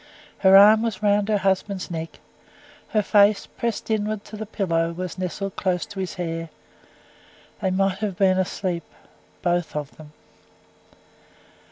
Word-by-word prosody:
Her 190 0 +7
arm 210 +2 +8
was 220 -4 -3
round 205 0 +2
her 210 - +3
husband's 195 -1 -1
neck; 165 -1 -6 0.7
her 215 -1 +1
face, 205 0 +4
pressed 235 -1 -4
inwards 215 -1 -2
to - - -6
the 215 0 -6
pillow, 170 -5 -1
was 180 +1 -6
nestled 190 +2 -4
close 180 -2 -1
to 200 - -9
his 185 -2 -4
hair. 165 -2 -4 1.1
They 190 - +1
might 195 0 0
have 200 -4 -3
been 190 -1 +3
asleep 185 -2 -2 0.6
both 175 -2 0
of 150 -1 -5
them. 150 -1 -13
190 Hz, 145 wpm, -23 LUFS, 175-205 Hz, 1.1 s, arm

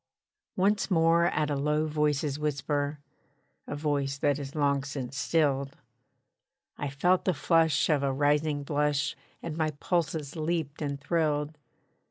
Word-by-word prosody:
Once 200 +3 +2
more 165 -1 +4
at 150 -3 0
a - - +1
low 150 +2 +1
voice's 150 -1 0
whisper 145 0 -1 0.7
(A - - -4
voice 145 -2 -1
that 145 0 +1
is 140 +1 -7
long 140 -2 +1
since 135 -2 -5
stilled) 140 -1 0 1.0
I 145 - -3
felt 175 +7 +2
the 185 - +2
flush 165 0 +3
of 150 -3 +2
a 140 -1 +1
rising 145 +1 +1
blush, 145 0 0 0.3
And 165 -2 -4
my 160 -1 +1
pulses 160 -4 -1
leaped 160 -2 -2
and 140 -2 -2
thrilled. 150 0 0
150 Hz, 140 wpm, -28 LUFS, 140-160 Hz, 1.0 s, more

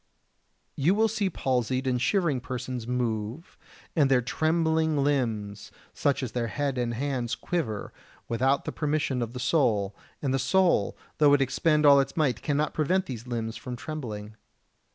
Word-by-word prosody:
72. 140 - -4
You 185 +5 +5
will 220 +1 +4
see 215 -2 -1
palsied 130 -4 -1
and 125 -2 0
shivering 165 -7 +1
persons 125 -1 -5
move, 120 +3 -3 0.4
and 145 -5 +4
their 130 -2 +5
trembling 160 +3 +1
limbs, 115 -8 -1 0.2
such 140 -1 0
as 125 - -3
their 120 0 -1
head 140 +1 -2
and 120 -1 -1
hands, 130 -2 -2
quiver, 135 - -3 0.3
without 130 +4 +1
the - - -2
permission 145 -4 -1
of 115 0 -3
the 125 - -5
soul, 115 -8 +1 0.2
and 135 -3 -1
the 135 - +1
soul, 185 +7 +2 0.2
though 145 -2 +6
it 140 - +1
expend 150 +4 +2
all 140 -1 +8
its 135 +5 -1
might, 140 -8 +1
cannot 150 +1 0
prevent 185 +5 +1
these 125 -4 -7
limbs 115 -2 -3
from 125 +2 -6
trembling. 110 -7 -6
130 Hz, 165 wpm, -27 LUFS, 120-155 Hz, 0.4 s, all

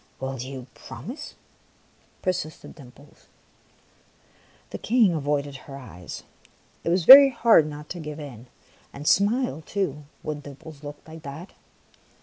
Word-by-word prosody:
" - - -36
Will 135 0 -4
you 130 0 -7
promise? 220 - -9 0.4
" - - -35
persisted 180 -4 -3
Dimples. 140 0 -17 1.4
The - - -6
King 225 -5 +3
avoided 145 -2 -1
her 135 -1 -8
eyes. 90 - -10 0.6
It - - -1
was 175 -1 +1
very 275 +4 +12
hard 230 - +4
not 150 0 -8
to 180 - -6
give 150 -1 -7
in 130 -5 -10 0.5
and 145 +2 -7
smile 220 -1 +2
too, 150 -6 -3 0.2
when 150 -1 -4
Dimples 145 +1 -12
looked 145 +1 -10
like 160 0 -11
that. 145 +6 -9
150 Hz, 135 wpm, -25 LUFS, 140-180 Hz, 1.4 s, very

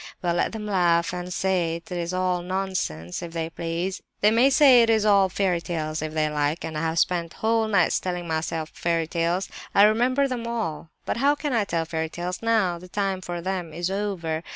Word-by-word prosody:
Well, 175 -1 +1
let 175 - 0
them 220 -1 -6
laugh, 175 -4 +2
and 180 0 -5
say 180 -3 0
it 170 +1 -10
is 175 -1 -2
all 185 -1 0
nonsense, 180 - -3
if 170 -1 -7
they 165 -1 -3
please. 170 +3 -3 0.2
They 210 - +5
may 240 +4 +5
say 270 -3 +7
it 230 - +3
is 220 -2 +3
all 200 -2 +5
fairy 185 -2 0
tales, 155 -3 -3
if 155 0 -4
they 155 -1 +2
like; 150 +1 -1
and 160 - -6
I 150 - -2
have 165 0 -1
spent 170 0 +1
whole 225 0 +1
nights 195 -5 +3
telling 180 -2 -4
myself 160 0 -2
fairy 165 -1 0
tales. 170 +3 -1 0.3
I 200 - +7
remember 245 +6 +3
them 240 -3 -4
all. 190 -10 -3 0.2
But - - -2
how 280 +4 +3
can 295 -2 -3
I 225 -4 +2
tell 165 -3 -1
fairy 160 0 -3
tales 175 +2 -5
now? 215 -7 +1
The 180 - -12
time 195 -1 -1
for 175 -1 -5
them 180 -3 -3
is 175 +3 -2
over. 185 -6 -2
180 Hz, 215 wpm, -25 LUFS, 165-205 Hz, 0.3 s, say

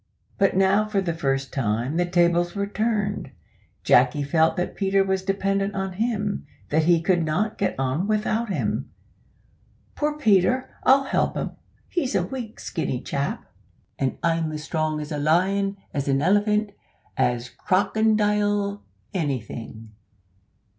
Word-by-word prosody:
But 195 -2 +3
now, 195 +2 +3
for 205 -2 +1
the 180 -3 -1
first 135 -4 -1
time, 120 +3 -1
the 175 0 +1
tables 175 0 +2
were 200 0 0
turned. 210 -1 -1 0.5
Jacky 145 -2 +4
felt 160 +4 +2
that 180 - -2
Peter 195 0 +2
was 190 0 0
dependent 195 +1 -1
on 190 -1 -2
him 210 0 -2 0.2
that 155 +1 +2
he 170 -1 +4
could 175 -1 +2
not 180 +8 -1
get 200 - 0
on 135 +8 0
without 215 +1 0
him. 190 - -2 1.0
"Poor 300 0 -1
Peter, 250 0 +2
I'll 275 +1 +5
help 270 - 0
him - - -2 0.4
he's 280 -7 -1
a - - +2
weak 240 -4 -7
skinny 140 -6 -3
chap, 140 +2 -3 0.5
and 130 -1 -1
I'm 165 -2 0
strong 155 0 -2
as 150 +1 -6
a 150 - -2
lion 195 +6 +2 0.2
as 140 -2 -2
a 135 - +3
elephant 205 +7 +2 0.4
as 120 0 0
a - - -23
crokindile 205 0 +2 0.3
anything! 115 - -4
190 Hz, 140 wpm, -24 LUFS, 155-205 Hz, 1.0 s, I'll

